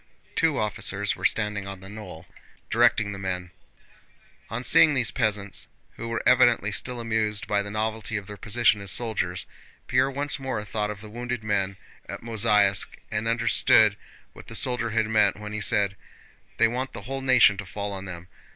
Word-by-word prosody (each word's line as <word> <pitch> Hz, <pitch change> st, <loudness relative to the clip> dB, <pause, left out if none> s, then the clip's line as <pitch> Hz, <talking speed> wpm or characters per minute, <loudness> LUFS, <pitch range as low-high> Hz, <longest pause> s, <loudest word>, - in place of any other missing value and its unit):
Two 160 Hz, -4 st, +2 dB
officers 105 Hz, 0 st, 0 dB
were -, -, -6 dB
standing 105 Hz, -2 st, 0 dB
on 100 Hz, -1 st, -7 dB
the 95 Hz, -, -11 dB
knoll, 105 Hz, -5 st, -9 dB, 0.5 s
directing 105 Hz, -2 st, +3 dB
the 100 Hz, -, -7 dB
men. 90 Hz, -2 st, -4 dB, 1.0 s
On 115 Hz, +3 st, -4 dB
seeing 150 Hz, +3 st, +6 dB
these 125 Hz, -4 st, +1 dB
peasants, 100 Hz, -3 st, -2 dB, 0.2 s
who 115 Hz, -, -7 dB
were 115 Hz, -, -2 dB
evidently 120 Hz, -5 st, +4 dB
still 125 Hz, +3 st, -3 dB
amused 110 Hz, -3 st, -1 dB
by 100 Hz, -1 st, +1 dB
the 100 Hz, -, -5 dB
novelty 110 Hz, +1 st, -2 dB
of 100 Hz, -, -6 dB
their 105 Hz, 0 st, -8 dB
position 110 Hz, +1 st, +2 dB
as 100 Hz, -, -6 dB
soldiers, 95 Hz, -6 st, -2 dB, 0.4 s
Pierre 135 Hz, -, +2 dB
once 140 Hz, +1 st, -1 dB
more 130 Hz, -6 st, -3 dB
thought 105 Hz, +1 st, -2 dB
of 105 Hz, -1 st, -6 dB
the 110 Hz, -, -10 dB
wounded 120 Hz, 0 st, -4 dB
men 100 Hz, -2 st, -1 dB, 0.3 s
at -, -, -7 dB
Mozháysk 105 Hz, -4 st, +2 dB
and 110 Hz, +1 st, -1 dB
understood 110 Hz, -2 st, +4 dB, 0.4 s
what -, -, -13 dB
the -, -, -8 dB
soldier 120 Hz, -2 st, +1 dB
had 110 Hz, 0 st, +1 dB
meant 105 Hz, -3 st, +3 dB
when 105 Hz, 0 st, -7 dB
he 105 Hz, -, -3 dB
said: 100 Hz, 0 st, +1 dB, 0.6 s
"They 115 Hz, -, +5 dB
want 125 Hz, +3 st, -3 dB
the 100 Hz, -, -8 dB
whole 135 Hz, +3 st, -4 dB
nation 130 Hz, -6 st, +5 dB
to 100 Hz, -, -6 dB
fall 100 Hz, +2 st, -4 dB
on 95 Hz, 0 st, -6 dB
them." 90 Hz, -1 st, -8 dB
105 Hz, 180 wpm, -26 LUFS, 100-115 Hz, 1.0 s, seeing